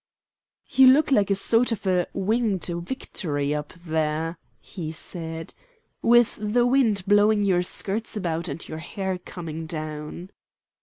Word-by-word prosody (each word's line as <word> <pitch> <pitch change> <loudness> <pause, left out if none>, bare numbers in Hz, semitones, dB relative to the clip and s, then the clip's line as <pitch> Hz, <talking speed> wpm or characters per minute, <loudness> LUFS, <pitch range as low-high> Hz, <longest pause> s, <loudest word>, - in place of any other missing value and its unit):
"You 265 -1 +7
look 280 +3 +5
like 205 -7 +3
a 195 - +3
sort 230 +5 +2
of 215 -2 -3
a 180 -2 +2
'Winged 205 -1 0
Victory' 170 - -3
up 150 0 -4
there," 160 +1 -1 0.2
he 165 -5 -6
said, 165 0 -6 0.5
"with 240 -1 +4
the 225 +3 +2
wind 245 -6 +2
blowing 205 +1 +4
your 185 -3 +3
skirts 205 +5 -2
about 170 -3 -2
and 145 +4 -6
your 155 - -6
hair 190 +2 -4
coming 165 -3 -7
down." 155 +3 -6
185 Hz, 140 wpm, -25 LUFS, 160-215 Hz, 0.5 s, You